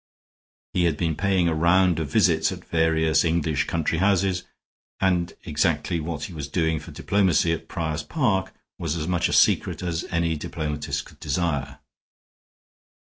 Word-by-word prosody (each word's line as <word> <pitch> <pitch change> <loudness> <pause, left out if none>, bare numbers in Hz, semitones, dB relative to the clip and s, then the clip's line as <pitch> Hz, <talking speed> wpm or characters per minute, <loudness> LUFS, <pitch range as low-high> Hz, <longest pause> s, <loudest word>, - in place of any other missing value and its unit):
He 90 - +2
had 80 -4 +1
been 80 -3 0
paying 95 -2 +1
a 85 - +1
round 85 +1 +3
of 75 -3 -3
visits - - +3
at - - -8
various 80 -1 +2
English 80 -4 0
country 80 -1 -1
houses, 95 -1 +2 0.5
and 90 -2 +1
exactly 80 +1 0
what 80 0 -4
he 95 - -6
was 75 -4 -5
doing 80 0 0
for - - -11
diplomacy 95 -4 +2
at 80 - -6
Prior's 80 -3 -3
Park 105 - 0 0.3
was 80 -2 -2
as 80 -2 -3
much 90 -1 +1
a - - -2
secret - - +3
as 85 -2 -2
any 85 -1 0
diplomatist 75 0 -4
could - - -17
desire. 70 -6 -2
85 Hz, 155 wpm, -24 LUFS, 80-90 Hz, 0.5 s, round